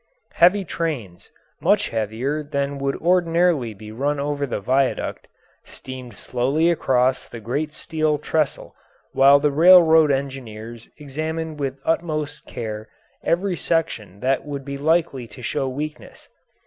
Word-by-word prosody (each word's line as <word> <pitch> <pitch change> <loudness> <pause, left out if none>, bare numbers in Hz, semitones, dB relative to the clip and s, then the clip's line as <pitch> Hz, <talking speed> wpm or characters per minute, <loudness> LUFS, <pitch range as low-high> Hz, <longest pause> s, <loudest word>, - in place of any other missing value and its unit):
Heavy 185 +3 +4
trains 135 - -4 0.3
much - - +2
heavier 115 +7 -2
than 140 -1 -3
would 140 0 -1
ordinarily 170 -6 +2
be 105 +1 -11
run 140 +5 -1
over 145 0 -2
the 120 - -3
viaduct 130 +5 0 0.4
steamed 130 -4 -9
slowly 140 +7 +1
across 130 -5 +1
the 115 - -8
great 140 +8 -2
steel 155 -1 -1
trestle 150 -1 -2 0.4
while 140 +1 +6
the 145 0 +2
railroad 160 0 +7
engineers 120 -5 -4
examined 155 +2 -4
with 135 -1 -3
utmost 155 -3 -2
care 110 -2 -6 0.3
every 180 +2 +1
section 140 - -2
that 130 +1 +1
would 140 -2 -6
be 140 -1 -5
likely 145 -4 0
to 115 +3 -12
show 135 +3 -1
weakness. 150 +4 -7
140 Hz, 130 wpm, -22 LUFS, 125-160 Hz, 0.4 s, railroad